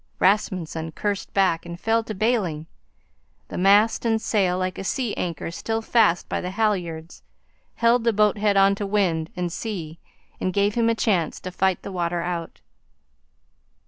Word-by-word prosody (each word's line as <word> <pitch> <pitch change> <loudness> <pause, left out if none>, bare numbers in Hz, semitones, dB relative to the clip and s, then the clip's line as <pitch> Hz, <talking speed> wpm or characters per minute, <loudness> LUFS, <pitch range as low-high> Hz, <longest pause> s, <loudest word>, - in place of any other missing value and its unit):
Rasmunsen 170 -5 0
cursed 205 +2 -3
back 185 -4 +2
and 170 0 -8
fell 225 +2 +1
to 215 - -5
bailing. 190 -8 0 0.8
The - - -6
mast 205 +4 +4
and 225 -1 +2
sail, 200 -5 +1
like 185 0 -2
a - - -4
sea 225 +4 -1
anchor, 170 -2 -4
still 225 +6 -3
fast 215 -7 +3
by - - -2
the 180 - -4
halyards, 180 -6 -2 0.5
held 235 0 +3
the 230 - +3
boat 210 -1 +2
head 205 -1 +2
on 195 0 +5
to 200 - -1
wind 175 -6 0
and 175 -1 -3
sea 170 -8 -5 0.4
and 185 - -1
gave 200 +1 +2
him 230 0 +2
a 230 - +2
chance 185 -8 0
to 185 - -6
fight 190 0 0
the - - -6
water 175 -2 -1
out. 170 -2 -5
195 Hz, 170 wpm, -24 LUFS, 175-215 Hz, 0.8 s, on